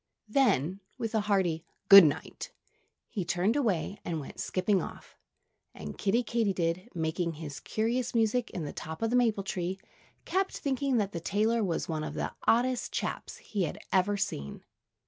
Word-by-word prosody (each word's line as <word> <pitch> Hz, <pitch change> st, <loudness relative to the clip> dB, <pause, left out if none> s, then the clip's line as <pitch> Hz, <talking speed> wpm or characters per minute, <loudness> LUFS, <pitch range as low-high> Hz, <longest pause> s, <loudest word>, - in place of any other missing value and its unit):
Then, 195 Hz, -, +2 dB, 0.2 s
with 230 Hz, -3 st, -3 dB
a 220 Hz, -, +3 dB
hearty 190 Hz, -6 st, +1 dB, 0.2 s
"Good 195 Hz, -1 st, +12 dB
night!" 150 Hz, -3 st, -2 dB, 0.6 s
he 195 Hz, -, -3 dB
turned 175 Hz, +6 st, +1 dB
away 205 Hz, -, 0 dB
and 165 Hz, -2 st, -2 dB
went 140 Hz, -, -9 dB
skipping 190 Hz, 0 st, +1 dB
off. -, -, -9 dB, 0.6 s
And 75 Hz, -1 st, -7 dB
Kiddie 230 Hz, +5 st, +1 dB
Katydid, 195 Hz, -4 st, 0 dB
making 165 Hz, +1 st, -1 dB
his 150 Hz, -2 st, -7 dB
curious 235 Hz, +3 st, -1 dB
music 230 Hz, +2 st, +2 dB
in 170 Hz, -5 st, -5 dB
the 145 Hz, -, -5 dB
top 160 Hz, +5 st, -6 dB
of 225 Hz, -, +1 dB
the -, -, +2 dB
maple 225 Hz, -5 st, +2 dB
tree, 185 Hz, 0 st, -3 dB, 0.5 s
kept 385 Hz, +1 st, 0 dB
thinking 275 Hz, -2 st, 0 dB
that 205 Hz, -3 st, 0 dB
the 170 Hz, -, -4 dB
tailor 215 Hz, +6 st, +1 dB
was 175 Hz, -4 st, -1 dB
one 155 Hz, -2 st, -2 dB
of -, -, -5 dB
the -, -, -3 dB
oddest 245 Hz, +2 st, +2 dB
chaps -, -, -4 dB
he 205 Hz, -, -4 dB
had 150 Hz, -, -5 dB, 0.2 s
ever 195 Hz, +2 st, +3 dB
seen. 70 Hz, -, -4 dB
195 Hz, 165 wpm, -30 LUFS, 170-230 Hz, 0.6 s, Good